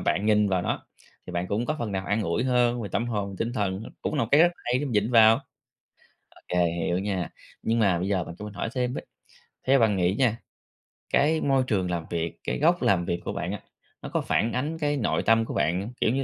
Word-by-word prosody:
bạn 100 Hz, +3 st, 0 dB
nhìn 105 Hz, -1 st, +4 dB
vào 90 Hz, -2 st, +1 dB
nó, -, -, -3 dB, 0.4 s
thì 90 Hz, -, -7 dB
bạn 85 Hz, +1 st, -1 dB
cũng 110 Hz, +4 st, -1 dB
có 155 Hz, -, -1 dB
phần 110 Hz, -4 st, -3 dB
nào 95 Hz, 0 st, -3 dB
an 105 Hz, +2 st, +1 dB
ủi 85 Hz, +5 st, 0 dB
hơn 125 Hz, -2 st, +2 dB
về 105 Hz, -, -4 dB
tâm 115 Hz, +3 st, 0 dB
hồn, 100 Hz, -4 st, -3 dB
tinh 115 Hz, -, -1 dB
thần, 100 Hz, -4 st, -1 dB, 0.2 s
cũng -, -, -2 dB
là 145 Hz, -, +1 dB
một -, -, -8 dB
cái 145 Hz, -, +7 dB
rất 175 Hz, +1 st, +5 dB
hay 125 Hz, +1 st, -1 dB
để 145 Hz, -, -2 dB
vịn 105 Hz, 0 st, +1 dB
vào. 115 Hz, -2 st, +7 dB, 0.9 s
Ô -, -, -21 dB
kê, 90 Hz, -1 st, +2 dB
hiểu 85 Hz, +1 st, -1 dB
nha, 95 Hz, -3 st, -2 dB, 0.3 s
nhưng 115 Hz, +1 st, +1 dB
mà 95 Hz, -6 st, +3 dB
bây 95 Hz, -, -2 dB
giờ 95 Hz, -4 st, 0 dB
bạn 85 Hz, -, -9 dB
cho 105 Hz, -, -7 dB
mình 105 Hz, -1 st, -8 dB
hỏi 105 Hz, -, -3 dB
thêm 125 Hz, -1 st, 0 dB
với, -, -, -6 dB, 0.6 s
theo 135 Hz, +1 st, +5 dB
bạn 110 Hz, -3 st, +3 dB
nghĩ 90 Hz, 0 st, +2 dB
nha, 120 Hz, -4 st, +3 dB, 0.8 s
cái 155 Hz, +3 st, +3 dB
môi 135 Hz, -2 st, +2 dB
trường 95 Hz, -5 st, 0 dB
làm 85 Hz, -2 st, -2 dB
việc, 85 Hz, -1 st, -3 dB
cái -, -, -2 dB
góc 170 Hz, +4 st, +3 dB
làm 90 Hz, -3 st, +2 dB
việc 85 Hz, -, -2 dB
của -, -, -3 dB
bạn -, -, -3 dB
á, -, -, -5 dB, 0.4 s
nó -, -, -6 dB
có -, -, 0 dB
phản 115 Hz, -, 0 dB
ánh 150 Hz, +6 st, -2 dB
cái 145 Hz, -1 st, 0 dB
nội 120 Hz, -, 0 dB
tâm 115 Hz, 0 st, +4 dB
của -, -, -6 dB
bạn, 90 Hz, +8 st, 0 dB
kiểu -, -, +3 dB
như 135 Hz, +1 st, 0 dB
105 Hz, 250 wpm, -26 LUFS, 95-125 Hz, 0.9 s, cái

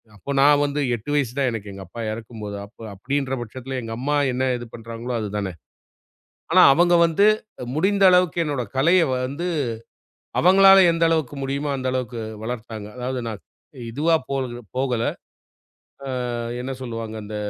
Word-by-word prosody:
அப்போ 140 Hz, +8 st, -7 dB
நா 140 Hz, -, +7 dB, 0.2 s
வந்து 145 Hz, +1 st, -2 dB, 0.2 s
8 115 Hz, +6 st, -7 dB
வயசு 135 Hz, -5 st, +1 dB
தான் 135 Hz, -, +2 dB
எனக்கு 105 Hz, -3 st, -6 dB
எங்க 95 Hz, -, -8 dB
அப்பா 115 Hz, +5 st, -8 dB
இறக்கும்போது, 110 Hz, -2 st, -7 dB
அப்ப 110 Hz, -, -22 dB, 0.2 s
அப்படீன்ற 135 Hz, +5 st, -2 dB
பட்சத்தில 130 Hz, +3 st, -6 dB
எங்க 115 Hz, 0 st, -5 dB
அம்மா 145 Hz, +3 st, 0 dB, 0.2 s
என்ன 130 Hz, +1 st, 0 dB
இது 120 Hz, -1 st, -8 dB
பண்ணுறாங்களோ 115 Hz, +1 st, -6 dB
அது 105 Hz, -2 st, -3 dB
தான. 95 Hz, -3 st, -3 dB, 1.0 s
ஆனா -, -, +7 dB
அவங்க 175 Hz, +3 st, +4 dB
வந்து 170 Hz, +5 st, +3 dB, 0.5 s
முடிந்த 195 Hz, +5 st, +2 dB
அளவுக்கு 180 Hz, -2 st, +3 dB
என்னோட 140 Hz, -4 st, -2 dB
கலையை 170 Hz, +5 st, +4 dB, 0.2 s
வந்து, 150 Hz, +7 st, -4 dB, 0.9 s
அவங்களால 195 Hz, +2 st, +7 dB
எந்த 165 Hz, -, -2 dB
அளவுக்கு 155 Hz, -4 st, 0 dB
முடியுமோ 140 Hz, +2 st, -2 dB
அந்த 130 Hz, -, -4 dB
அளவுக்கு 125 Hz, -2 st, -3 dB, 0.2 s
வளர்த்தாங்க. 110 Hz, -3 st, -6 dB
அதாவது 125 Hz, +1 st, -3 dB
நா 110 Hz, -, -3 dB, 0.6 s
இதுவா 160 Hz, +7 st, +2 dB
போறது 130 Hz, -3 st, -2 dB, 0.2 s
போகல. 125 Hz, -3 st, 0 dB, 1.3 s
அ -, -, -3 dB, 0.3 s
என்ன 130 Hz, +2 st, -4 dB
சொல்லுவாங்க? 115 Hz, -3 st, -5 dB
இந்த 105 Hz, +1 st, -6 dB
130 Hz, 150 wpm, -23 LUFS, 115-150 Hz, 1.3 s, நா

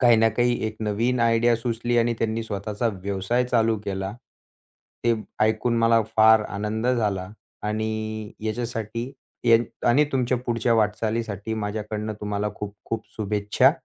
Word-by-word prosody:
काही 120 Hz, -2 st, +6 dB
ना 115 Hz, 0 st, +5 dB
काही 120 Hz, +2 st, +1 dB
एक 110 Hz, 0 st, -5 dB
नवीन 115 Hz, +4 st, 0 dB
आयडिया 115 Hz, +1 st, +4 dB
सुचली 120 Hz, +1 st, -1 dB
आणि 115 Hz, 0 st, +2 dB
त्यांनी 115 Hz, 0 st, -1 dB
स्वतःचा 105 Hz, +2 st, -2 dB
व्यवसाय 100 Hz, +5 st, 0 dB
चालू 115 Hz, -2 st, +2 dB
केला. 95 Hz, 0 st, -3 dB, 0.9 s
ते 120 Hz, 0 st, +4 dB, 0.3 s
ऐकून 110 Hz, +2 st, +2 dB
मला 115 Hz, 0 st, +4 dB
फार 110 Hz, 0 st, +7 dB
आनंद 105 Hz, +3 st, -2 dB
झाला 105 Hz, -7 st, 0 dB, 0.3 s
आणि 110 Hz, 0 st, -3 dB
याच्यासाठी 115 Hz, +2 st, -3 dB, 0.3 s
ये 115 Hz, -1 st, +7 dB, 0.3 s
आणि 130 Hz, +5 st, +5 dB
तुमच्या 125 Hz, -1 st, +1 dB
पुढच्या 115 Hz, 0 st, +2 dB
वाटचालीसाठी 110 Hz, 0 st, -1 dB
माझ्याकडून 105 Hz, 0 st, -3 dB
तुम्हाला 105 Hz, 0 st, -1 dB
खूप 105 Hz, 0 st, -6 dB
खूप 115 Hz, -1 st, -3 dB
शुभेच्छा! 105 Hz, -1 st, +3 dB
110 Hz, 135 wpm, -24 LUFS, 105-115 Hz, 0.9 s, फार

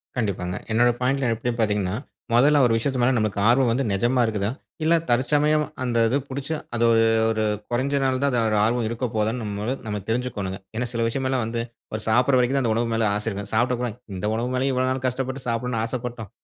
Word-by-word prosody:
கண்டிப்பாங்க. 95 Hz, -7 st, -2 dB, 0.2 s
என்னுடைய 120 Hz, +2 st, +4 dB
பாயிண்ட்‌ல 130 Hz, -1 st, +1 dB
எப்பிடின்னு 115 Hz, +1 st, -3 dB
பார்த்தீங்கன்னா, 105 Hz, -3 st, 0 dB, 0.4 s
முதல்ல 145 Hz, +5 st, +5 dB
ஒரு 115 Hz, -, +3 dB
விஷயத்து 130 Hz, +3 st, -1 dB
மேல 125 Hz, +2 st, +3 dB
நம்மளுக்கு 110 Hz, -2 st, 0 dB
ஆர்வம் 125 Hz, 0 st, +4 dB
வந்து 130 Hz, +4 st, +1 dB
நிஜமா 120 Hz, +6 st, +2 dB
இருக்குதா? 105 Hz, -2 st, -1 dB, 0.3 s
இல்ல 165 Hz, +2 st, +4 dB
தற்சமயம் 150 Hz, +5 st, +3 dB, 0.2 s
அந்த 120 Hz, -2 st, -1 dB
இது 125 Hz, +5 st, +2 dB
பிடிச்சு 140 Hz, +4 st, -3 dB, 0.2 s
அது 120 Hz, -, +1 dB
ஒரு 115 Hz, 0 st, +4 dB, 0.3 s
ஒரு 110 Hz, -1 st, 0 dB, 0.3 s
கொறஞ்சநாள்தான் 135 Hz, +2 st, +1 dB
அதோட 110 Hz, -1 st, +1 dB
ஆர்வம் 115 Hz, +1 st, +1 dB
இருக்க 115 Hz, +2 st, -3 dB
போகுதான்னு 110 Hz, +3 st, 0 dB
நம்மளும் 105 Hz, +5 st, -3 dB
நம்ம 105 Hz, -1 st, -3 dB
தெரிஞ்சுக்கணுங்க. 110 Hz, -5 st, -2 dB, 0.2 s
ஏன்னா 120 Hz, +2 st, -1 dB
சில 115 Hz, 0 st, 0 dB
விஷயம் 130 Hz, +3 st, -2 dB
எல்லாம் 130 Hz, -2 st, 0 dB
வந்து, 115 Hz, +1 st, -2 dB, 0.3 s
ஒரு 110 Hz, -, -3 dB
சாப்பிடற 125 Hz, +4 st, +4 dB
வரைக்கும் 125 Hz, +2 st, +2 dB
தான் 135 Hz, -, +1 dB
அந்த 110 Hz, -, +2 dB
உணவு 115 Hz, +1 st, 0 dB
மேல 115 Hz, -1 st, +2 dB
ஆசை 105 Hz, +2 st, -3 dB
இருக்கும். 100 Hz, -1 st, -6 dB
சாப்பிட்டப்புறம், 120 Hz, 0 st, 0 dB, 0.2 s
"இந்த 95 Hz, +3 st, -2 dB
உணவு 115 Hz, +3 st, -1 dB
மேலயா 130 Hz, +1 st, +1 dB
இவ்வளவு 130 Hz, 0 st, +1 dB
நாள் 130 Hz, 0 st, -3 dB
கஷ்டப்பட்டு 130 Hz, +1 st, -3 dB
சாப்பிடணும்னு 115 Hz, 0 st, -1 dB
ஆசைப்பட்டோம்! 120 Hz, -2 st, -5 dB
120 Hz, 195 wpm, -24 LUFS, 110-130 Hz, 0.4 s, முதல்ல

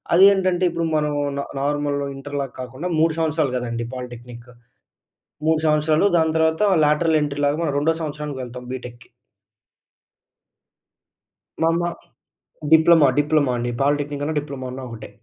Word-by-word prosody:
అదేంటంటే, 185 Hz, -1 st, +5 dB
ఇప్పుడు 170 Hz, -1 st, -2 dB
మనం 150 Hz, -1 st, 0 dB, 0.3 s
న -, -, 0 dB, 0.2 s
నార్మల్ 145 Hz, 0 st, -1 dB, 0.2 s
ఇంటర్‌లాగా 140 Hz, -1 st, -5 dB
కాకుండా, 130 Hz, +8 st, -5 dB
3 160 Hz, 0 st, +3 dB
సంవత్సరాలు 155 Hz, -4 st, 0 dB
కదండీ! 120 Hz, -1 st, -3 dB
పాలిటెక్నిక్. 120 Hz, -1 st, -9 dB, 1.0 s
3 160 Hz, -1 st, +3 dB
సంవత్సరాలు, 155 Hz, +4 st, +3 dB
దాని 160 Hz, -1 st, +2 dB
తర్వాత 160 Hz, +4 st, +1 dB, 0.2 s
లాటరల్ 155 Hz, +1 st, +2 dB
ఎంట్రీ‌ 145 Hz, 0 st, -3 dB
లాగా 145 Hz, +2 st, 0 dB
మనం 145 Hz, -4 st, -1 dB
రెండో 160 Hz, +3 st, +2 dB
సంవత్సరానికి 150 Hz, -3 st, -5 dB
వెళ్తాం 125 Hz, 0 st, -9 dB
బీటెక్‌కి. 120 Hz, -2 st, -9 dB, 2.5 s
మా -, -, +4 dB
అమ్మ 170 Hz, +1 st, 0 dB, 0.9 s
డిప్లొమా, 160 Hz, -1 st, +6 dB
డిప్లొమా 145 Hz, -3 st, +2 dB
అండి. 120 Hz, 0 st, -2 dB
పాలిటెక్నిక్ 145 Hz, 0 st, 0 dB
అన్న, 155 Hz, +1 st, -2 dB
డిప్లొమా 140 Hz, -3 st, -7 dB
అన్న 130 Hz, -, -7 dB
ఒకటే. 110 Hz, -3 st, -9 dB
145 Hz, 130 wpm, -22 LUFS, 130-160 Hz, 2.5 s, డిప్లొమా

